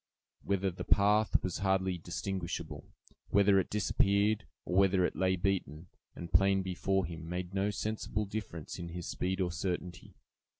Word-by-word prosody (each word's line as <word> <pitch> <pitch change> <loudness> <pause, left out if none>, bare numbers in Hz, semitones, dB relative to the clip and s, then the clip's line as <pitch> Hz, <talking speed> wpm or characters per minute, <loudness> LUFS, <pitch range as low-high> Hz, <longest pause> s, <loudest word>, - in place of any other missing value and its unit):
Whether 100 -1 0
the 90 - -6
path 105 +2 +3
was 90 -2 -2
hardly 95 -2 +1
distinguishable, 90 +1 -4 0.4
whether 100 -1 +5
it 95 - -1
disappeared, 100 -2 +2 0.2
or 90 - -2
whether 95 -1 +4
it - - -2
lay 95 0 +2
beaten 90 -3 -2 0.3
and 85 -1 -8
plain 95 +2 +4
before 95 +1 0
him, 80 -1 -7
made 90 +1 -4
no 100 +1 +1
sensible 105 0 -2
difference 95 -6 -6
in 85 -1 -5
his 85 0 -6
speed 95 +1 -2
or 90 -2 0
certainty. 90 0 -4
95 Hz, 155 wpm, -32 LUFS, 90-100 Hz, 0.4 s, whether